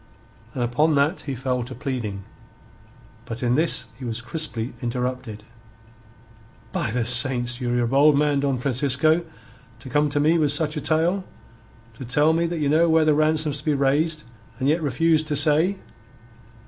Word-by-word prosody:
And 125 - -1
upon 150 +6 +1
that 145 +6 +1
he 135 - -3
fell 125 0 -2
to 125 +2 -7
pleading. 115 -7 -4 1.0
But 115 0 -7
in 120 0 +2
this 160 +5 +1
he - - -9
was 115 -1 -3
crisply 120 -2 -3
interrupted. 125 -3 -4 1.3
"By - - -2
the 115 +1 -1
Saints! 125 0 +1
Ye're 120 0 0
a - - 0
bold 140 +3 +4
man, 145 -1 +2
Don 140 -2 0
Francisco, 140 +5 +1 0.6
to 130 - -11
come 150 +2 +1
to 145 0 -1
me 160 +3 +3
with 150 -2 +2
such 150 +1 +1
a 150 - -3
tale 165 +6 +1 0.7
to 115 - -10
tell 150 +6 +2
me 170 +1 +1
that 170 0 -4
ye 150 -2 -1
know 160 +4 +3
where 160 -1 +4
the 155 - +4
ransom's 155 -1 +1
to - - -12
be 150 -2 +1
raised, 150 +3 +1 0.3
and 130 +1 -1
yet 155 +3 +3
to - - -9
refuse 155 +3 +2
to 155 -1 -3
say. 155 +6 +3
140 Hz, 175 wpm, -23 LUFS, 125-155 Hz, 1.3 s, bold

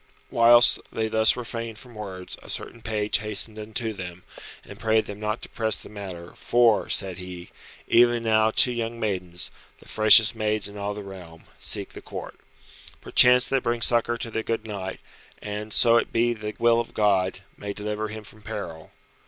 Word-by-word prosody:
Whilst 120 +1 +6
they 110 0 -2
thus 110 0 +3
refrained 115 -2 -6
from 125 0 -14
words 95 -4 -7
a - - -13
certain 115 - -4
page 105 -1 0
hastened 105 +1 -1
unto 110 +1 -3
them, 90 -2 -8 0.4
and 100 - -12
prayed 110 -1 +2
them 100 0 -8
not 105 +1 -3
to - - -6
press 110 -2 0
the - - -11
matter, 95 -5 -9
for 120 -3 +2
(said 95 -2 -2
he) 90 -1 -9 0.4
"even 120 0 +4
now 110 -1 +3
two 125 +3 +3
young 115 -1 -4
maidens, 90 -5 -1 0.3
the - - -18
freshest 110 +1 +6
maids 110 -1 -1
in 100 - -12
all 100 0 -4
the 105 - -7
realm, 90 -4 -11 0.2
seek - - -1
the - - -11
Court. - - -9 0.6
Perchance 125 0 +5
they 135 - +1
bring 120 -2 -1
succour 120 0 +2
to 115 - -5
the 110 - -2
good 115 0 -3
knight, 95 -3 -6 0.4
and, 105 +1 -6
so 115 +2 +5
it - - -1
be 120 +1 +2
the 105 -1 -7
will 115 0 +3
of 120 - -5
God, 95 -3 +1
may 100 - -6
deliver 105 +1 -4
him 110 0 -8
from 110 0 -14
peril." 80 -5 -7
110 Hz, 185 wpm, -25 LUFS, 100-115 Hz, 0.6 s, Whilst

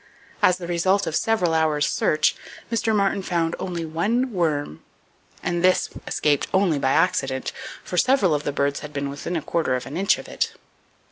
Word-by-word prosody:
As 180 - +4
the 180 - -7
result 185 +3 +1
of 155 - -2
several 185 -7 +1
hours' 155 -2 +2
search, 155 - +2 0.4
Mr. 225 -1 +1
Martin 200 -1 +1
found 170 -3 -1
only 175 -3 -3
one 215 +11 0
worm, 150 - -1 0.6
and 175 -1 -1
this 185 0 +3
one - - -11
escaped 145 -2 +1
only 190 -6 +2
by 135 - +1
accident, 135 -6 +1 0.3
for 180 - -5
several 235 - +3
of 145 - 0
the 145 - -2
birds 140 0 0
had 150 -1 -9
been 140 -1 -3
within 145 +5 -5
a 160 - -2
quarter 165 -6 0
of 125 - -4
an 150 - -6
inch 195 +2 +3
of - - -10
it. - - -2
170 Hz, 190 wpm, -23 LUFS, 150-190 Hz, 0.6 s, As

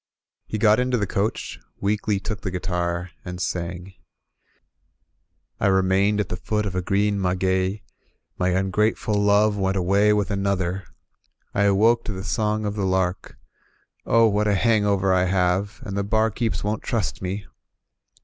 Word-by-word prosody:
He 110 - -3
got 105 +1 +4
into 125 0 +1
the 105 - 0
coach, 100 +3 -2 0.2
weakly 105 0 0
took 105 +2 -5
the 95 - -3
guitar, 90 -1 -2
and 90 -1 -7
sang: 90 +1 -4 1.7
"7 100 - +3
remained 95 +2 +2
at 105 - -1
the - - -2
foot 105 +4 -2
of 100 - -3
a 95 - -1
green 100 +2 0
maguey 95 +2 0 0.5
My 90 - 0
tmgrateftd 95 +4 0
love 105 +1 +3
went 95 0 0
away 100 +3 +3
with 105 -1 +1
another, 95 -2 -1 0.7
I 100 - +2
awoke 110 +4 +3
to 110 - -3
the 95 0 -6
song 105 +4 -1
of 100 - -1
the 105 -1 -3
lark: 95 0 -1 0.7
Oh, 115 0 +4
what 105 0 +1
a 105 - +3
hangover 100 -3 +2
I 90 0 +3
have, 95 +3 0
and 100 - -5
the 100 - 0
barkeeps 110 +2 0
won*t 105 +1 -2
trust 115 -6 -2
me! 95 +2 -4
100 Hz, 155 wpm, -23 LUFS, 95-105 Hz, 1.7 s, got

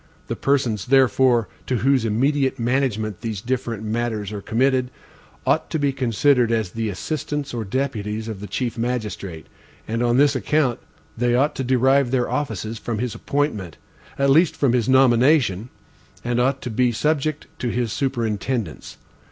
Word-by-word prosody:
The - - -1
persons, 125 -8 0
therefore, 130 -3 +4 0.2
to 130 - 0
whose 130 0 +2
immediate 135 +5 +1
management 115 -5 -1
these 110 -4 -3
different 120 -1 -3
matters 110 -2 -2
are 105 -1 -5
committed, 130 +3 +1 0.6
ought - - +1
to - - -1
be 140 -2 +1
considered 125 -1 +2
as 110 -5 0
the 115 +1 -2
assistants 145 - -4
or 115 -2 -2
deputies 110 -2 -3
of 110 -4 -5
the 105 - -7
chief 120 +4 -3
magistrate, 105 -8 -3 0.4
and 115 +2 -2
on 120 0 +2
this 145 0 +4
account, 130 0 +1 0.4
they 120 +1 +1
ought 140 +4 +2
to 135 - -3
derive 130 +1 +3
their 125 -1 0
offices 110 -6 -3
from 115 -2 -3
his 120 +1 -2
appointment, 110 - -2 0.4
at 140 0 +3
least 160 +4 +4
from 135 -4 +2
his 125 -1 +1
nomination, 125 - +4 0.5
and 120 0 0
ought 135 +2 +1
to 125 - -4
be 125 +2 +2
subject 150 +4 -1
to 125 - -1
his 115 -2 -1
superintendence. 115 - -2
120 Hz, 160 wpm, -22 LUFS, 110-135 Hz, 0.6 s, therefore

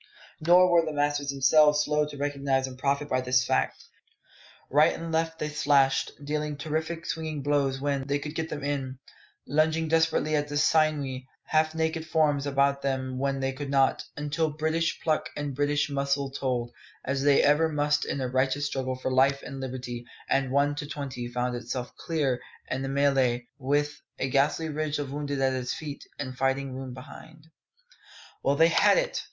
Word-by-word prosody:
Nor 180 +3 +5
were 170 -1 +5
the 155 -1 -4
masters 145 -1 0
themselves 150 +2 +5
slow 150 0 +1
to 145 -1 -9
recognise 140 -2 0
and 130 -1 -8
profit 140 +2 0
by 130 -2 0
this 125 0 +2
fact. - - 0 0.9
Right 150 +4 +5
and 165 0 -6
left 160 0 0
they 150 - -3
slashed, 140 -2 +2
dealing 150 0 -2
terrific 160 +3 -3
swinging 155 -3 -3
blows 140 -2 +1
when, 140 -1 -1
they 140 0 +1
could 150 +1 -6
get 160 0 -3
them 145 -2 -5
in, 135 -2 -3 0.5
lunging 155 +3 +2
desperately 160 -1 +2
at 145 0 0
the 145 0 -3
sinewy, 145 -4 +1 0.2
half 155 0 +1
naked 160 0 -1
forms 145 -3 +2
about 140 0 +2
them 130 -2 -2
when 135 0 -1
they 135 0 0
could 140 +1 -6
not, 135 -1 +2
until 150 +2 0
British 160 +2 -1
pluck 155 -2 0
and 145 -1 -3
British 145 +2 +1
muscle 140 -1 -1
told, 125 -3 -2 0.3
as 135 +1 -1
they 140 0 +4
ever 150 +3 +4
must 150 -1 +1
in 140 - -3
a 130 - -1
righteous 130 +3 0
struggle 130 -2 -2
for 130 0 -3
life 135 +2 +3
and 135 - -7
liberty, 125 -2 -5 0.2
and 135 -1 +1
One 140 +2 +2
to 150 - -4
twenty 135 -5 -5
found 125 0 -2
itself 120 +1 -5
clear 145 -7 -1 0.3
of 130 - -1
the 135 - -3
mêlée, 135 -3 +2
with 145 +2 0 0.2
a 135 - -1
ghastly 145 +4 +2
ridge 155 0 -2
of 145 -2 -4
wounded 145 -1 -3
at 135 0 +2
its 125 -1 -2
feet, 145 -3 -7
and 130 -3 -5
fighting 135 +1 0
room 130 -1 -6
behind. 155 +4 -13 0.9
Well 140 - +2
they 165 +3 +5
had 170 - +4
it! - - 0
145 Hz, 180 wpm, -27 LUFS, 135-150 Hz, 0.9 s, Nor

